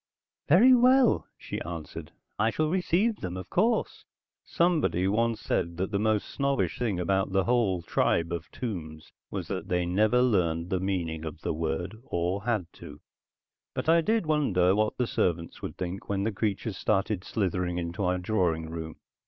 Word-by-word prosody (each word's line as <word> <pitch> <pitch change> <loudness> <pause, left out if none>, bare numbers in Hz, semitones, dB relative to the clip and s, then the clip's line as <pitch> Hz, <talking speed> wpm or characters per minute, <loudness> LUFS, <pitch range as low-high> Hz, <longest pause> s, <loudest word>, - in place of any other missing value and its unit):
"Very 220 - +7
well," 250 0 +4
she - - -6
answered. 85 -3 -7 0.3
"I 110 +2 +3
shall 155 +8 0
receive 190 +4 +1
them, 90 0 -5
of 95 0 -8
course." 225 +5 +1 0.4
Somebody 160 - +1
once 115 +2 +1
said 85 0 -2
that 95 +3 -2
the 100 - 0
most 110 -1 +1
snobbish 140 0 -1
thing 110 -7 -1
about 95 +2 0
the 95 0 +3
whole 110 -7 +1
tribe 85 0 +1
of 85 -1 -5
Tombs 80 -10 -6 0.2
was - - -4
that - - -4
they'd 90 -1 0
never 110 +7 +3
learned 85 -7 +1
the 95 - +1
meaning 85 -4 -2
of 80 -2 -7
the - - -1
word, 80 +5 -3
or 90 0 -2
had 110 -7 0
to. 75 0 -11 0.8
But - - -1
I 165 +1 +6
did 220 +2 +1
wonder 105 - +2
what 105 +1 0
the 125 - +1
servants 85 -6 -1
would - - -6
think 90 +1 -5
when 100 -1 0
the 110 - 0
creatures 100 0 -2
started 100 -2 0
slithering 90 -5 -1
into 85 +3 -3
our 90 0 +1
drawing 90 -5 0
room. 80 -1 -6
95 Hz, 170 wpm, -28 LUFS, 85-120 Hz, 0.8 s, Very